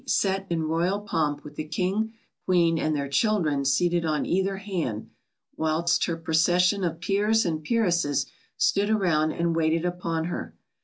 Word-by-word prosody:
_, - - -10
sat 195 0 +1
in 165 -2 -1
royal 170 +5 0
pomp 150 -8 -2
with 150 - -10
the 155 - -3
King, 190 +8 -1 0.3
Queen, 170 -3 +3
and 155 -1 0
their 140 -1 -2
children 150 -3 +1
seated 170 +5 +2
on 155 -2 0
either 190 +2 0
hand, 175 - -4 0.5
whilst 160 +2 +1
her 165 - -2
procession 175 +4 +2
of 165 -2 -2
peers 205 +4 +1
and 160 -2 -2
peeresses 170 - +1 0.3
stood 200 +1 +2
around 170 -8 +2
and 170 0 -1
waited 165 +1 +1
upon 170 -2 -2
her. 175 - -5
170 Hz, 160 wpm, -26 LUFS, 155-190 Hz, 0.5 s, Queen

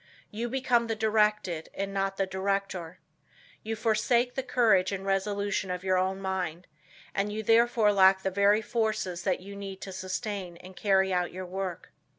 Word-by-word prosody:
You 230 +3 -3
become 250 -2 +1
the 225 - -1
directed 210 -6 +1
and 195 0 -3
not 195 0 -1
the 195 - +1
director. 190 -3 -2 0.6
You 225 +1 -3
forsake 235 +3 +1
the 265 - -2
courage 225 -8 +3
and 195 -1 -4
resolution 200 0 -1
of 180 0 -3
your 185 -1 +2
own 190 +1 -1
mind, 180 -3 -3 0.5
and 200 +1 -1
you 215 +1 -4
therefore 225 -1 +4
lack 190 -1 +5
the 190 - 0
very 200 +3 +3
forces 215 -6 -1
that 185 -2 0
you 200 +2 -9
need 195 -1 -7
to 195 - -6
sustain 185 -1 -4
and 185 +1 -13
carry 190 -1 +2
out 180 -1 0
your 185 +1 -6
work. 185 -1 -5
195 Hz, 170 wpm, -28 LUFS, 185-215 Hz, 0.6 s, lack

